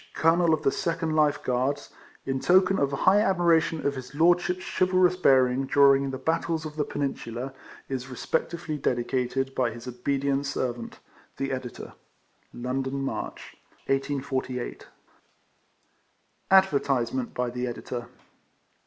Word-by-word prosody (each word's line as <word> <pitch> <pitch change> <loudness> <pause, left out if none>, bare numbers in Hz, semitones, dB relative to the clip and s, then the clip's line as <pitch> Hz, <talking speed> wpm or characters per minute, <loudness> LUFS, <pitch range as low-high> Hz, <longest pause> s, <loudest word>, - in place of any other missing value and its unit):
COLONEL 165 +1 +3
OF 155 - -10
THE 135 - +3
SECOND 165 -2 -1
LIFE 150 -2 +2
GUARDS, 130 +3 0
&c. - - -15 0.3
&e., 135 - -2
IN 135 - -1
TOKEN 185 +5 +4
OF 140 - +2
HIGH 185 +8 +4
ADMIRATION 170 -5 +2
OF 140 - +2
HIS 130 0 -9
LORDSHIP's 175 +3 +3
CHIVALROUS 185 -1 +2
BEARING 130 -4 +3
DURING 140 0 +5
THE 130 - -4
BATTLES 160 +3 -1
OF 150 -1 -7
THE 150 -2 -1
PENINSULA, 135 -2 -4 0.3
IS 130 -1 -4
RESPECTFULLY 155 +4 -3
DEDICATED,. 130 +1 -1
BY 125 -3 +1
HIS 115 +1 -9
OBEDIENT 140 +3 -1
SERVANT, 120 -4 -3 0.4
THE 135 0 -2
EDITOE. 130 -2 -6 0.6
London, 130 +2 -3
March, 135 - -5 0.3
1848. 135 -2 -2 1.6
ADVERTISEMENT 135 -10 +2
BY 125 0 -1
THE 125 +1 -3
EDITOR. 120 0 -5
135 Hz, 125 wpm, -26 LUFS, 130-160 Hz, 1.6 s, DURING